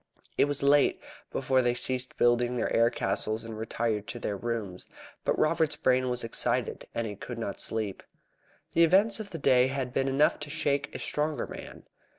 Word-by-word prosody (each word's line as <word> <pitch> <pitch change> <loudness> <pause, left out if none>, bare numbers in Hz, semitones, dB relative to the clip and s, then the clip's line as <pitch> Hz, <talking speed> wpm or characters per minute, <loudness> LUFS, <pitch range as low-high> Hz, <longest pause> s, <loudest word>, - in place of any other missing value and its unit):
It - - +4
was 145 -1 -2
late 140 0 +4 0.3
before 130 -1 +2
they 120 -1 +1
ceased 130 0 0
building 120 +1 +3
their 120 - -1
air 115 0 +5
castles 110 0 -1
and 115 -1 -7
retired 110 -1 -2
to - - -6
their 105 -3 -3
rooms. 105 -4 -4 0.4
But - - 0
Robert's 160 -1 +2
brain 130 -4 +2
was 125 0 -1
excited, 115 - -1
and 115 - -1
he 105 -2 -5
could 120 +4 -7
not 115 -3 -3
sleep. 110 -3 -2 0.7
The 170 - +5
events 195 +6 +4
of 215 -2 -6
the 165 - -6
day 130 -3 +4
had 130 -2 -3
been 135 +1 +1
enough 135 +3 +3
to 150 - -6
shake 145 -2 -1
a - - -1
stronger 150 0 -1
man. - - -10
125 Hz, 185 wpm, -28 LUFS, 115-145 Hz, 0.7 s, air